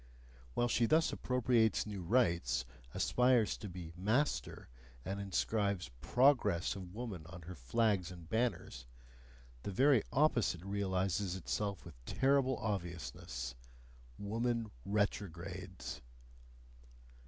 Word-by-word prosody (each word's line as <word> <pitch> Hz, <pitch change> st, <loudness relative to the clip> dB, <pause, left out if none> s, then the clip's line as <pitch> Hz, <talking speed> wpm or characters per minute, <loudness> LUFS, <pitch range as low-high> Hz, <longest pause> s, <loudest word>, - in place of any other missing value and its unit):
While 120 Hz, -, +2 dB
she 120 Hz, -1 st, +2 dB
thus 160 Hz, +4 st, +3 dB
appropriates 125 Hz, -4 st, +2 dB
new 105 Hz, -3 st, -5 dB
rights, 85 Hz, -, +2 dB, 0.3 s
aspires 125 Hz, -, +3 dB
to 105 Hz, -, -7 dB
be 85 Hz, -2 st, -8 dB
"master," 110 Hz, -, 0 dB, 0.4 s
and 100 Hz, +1 st, -3 dB
inscribes 100 Hz, -, 0 dB
"progress" 125 Hz, -, +3 dB
of 95 Hz, -1 st, -8 dB
woman 110 Hz, -8 st, -5 dB
on 90 Hz, 0 st, -10 dB
her 90 Hz, +3 st, -7 dB
flags 95 Hz, -, +1 dB
and 85 Hz, -3 st, -10 dB
banners, 110 Hz, -, -1 dB, 0.7 s
the -, -, -4 dB
very 130 Hz, +4 st, +5 dB
opposite 115 Hz, -, +2 dB
realises 95 Hz, -1 st, 0 dB
itself 100 Hz, +2 st, -2 dB
with 70 Hz, -8 st, -13 dB
terrible 135 Hz, -1 st, +2 dB
obviousness: 80 Hz, -, -4 dB, 0.6 s
WOMAN 115 Hz, +2 st, -1 dB
RETROGRADES. 95 Hz, -3 st, -3 dB
100 Hz, 105 wpm, -35 LUFS, 85-115 Hz, 0.7 s, very